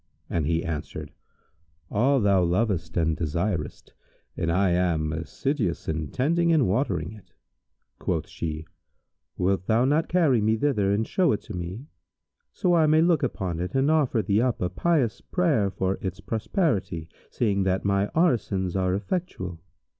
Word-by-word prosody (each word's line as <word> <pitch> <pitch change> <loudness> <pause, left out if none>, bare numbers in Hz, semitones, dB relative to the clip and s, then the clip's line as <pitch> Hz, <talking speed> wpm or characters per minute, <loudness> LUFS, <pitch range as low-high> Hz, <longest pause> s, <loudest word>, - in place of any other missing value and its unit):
and 80 -4 0
he 85 0 +1
answered, 75 -2 -5 0.8
"All 130 +6 +3
thou 100 -4 +3
lovest 90 -1 0
and 80 -1 +2
desirest, 85 +1 -3 0.4
and 85 - -1
I 95 +2 +2
am 85 -3 +1
assiduous 90 - -2
in 80 -1 -2
tending 170 - +1
and 155 -7 +4
watering 95 - 0
it." 105 -3 -15 0.7
Quoth - - -2
she, 80 -1 -5 0.7
"Wilt 95 0 0
thou 115 +3 +3
not 150 +4 +1
carry 155 -10 +3
me 110 +1 +2
thither 110 -7 +1
and 105 +2 0
show 185 - +2
it 105 - -2
to - - -8
me, 90 +9 -5 0.7
so 180 - +1
I 160 -2 +4
may 155 +1 +5
look 170 -2 +3
upon 95 - -2
it 90 +8 -4
and 135 +3 +3
offer 140 -8 +2
thee 100 +2 +2
up 125 -1 0
a 90 - -1
pious 140 - +1
prayer 150 - +1
for 95 0 -2
its 95 0 -4
prosperity, 110 - -1 0.2
seeing 100 -4 0
that 95 +1 0
my 100 0 +2
orisons 110 - +1
are 95 -1 +1
effectual?" 100 - -4
100 Hz, 155 wpm, -26 LUFS, 90-135 Hz, 0.8 s, may